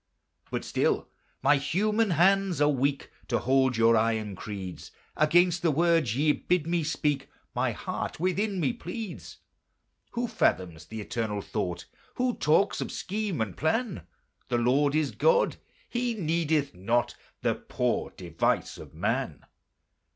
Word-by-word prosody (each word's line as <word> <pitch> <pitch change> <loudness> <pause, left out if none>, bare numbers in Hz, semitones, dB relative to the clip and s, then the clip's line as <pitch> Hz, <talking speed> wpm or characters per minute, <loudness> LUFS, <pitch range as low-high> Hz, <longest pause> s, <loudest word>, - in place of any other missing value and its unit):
But - - -3
still - - 0 0.3
my 145 +1 +5
human 210 +9 +1
hands 190 +1 +3
are 145 - +5
weak 140 0 0 0.2
To 120 - +1
hold 130 -1 +2
your 115 0 +5
iron 110 -2 +1
creeds: 95 -2 -7 0.3
Against 175 +3 +4
the 170 - +3
words 165 -6 +2
ye 150 +2 +4
bid 175 +1 0
me 170 0 0
speak 150 -2 -1 0.2
My - - +1
heart - - -4
within 190 +3 0
me 205 - +1
pleads. 225 -4 -7 0.8
Who 240 0 -1
fathoms 90 - 0
the 110 -1 -6
Eternal 105 -2 -3
Thought? 90 -5 -3 0.3
Who 250 0 +1
talks 165 +7 +2
of - - -3
scheme 200 - -3
and 105 -4 -2
plan? 160 - -1 0.4
The 120 - +2
Lord 140 +5 +2
is 155 -3 +1
God! 485 0 +3 0.3
He 240 -1 -1
needeth 160 -5 0
not 115 +7 0 0.3
The - - +3
poor - - -1
device 85 -2 -1
of - - -12
man. - - -2
150 Hz, 140 wpm, -28 LUFS, 115-185 Hz, 0.8 s, my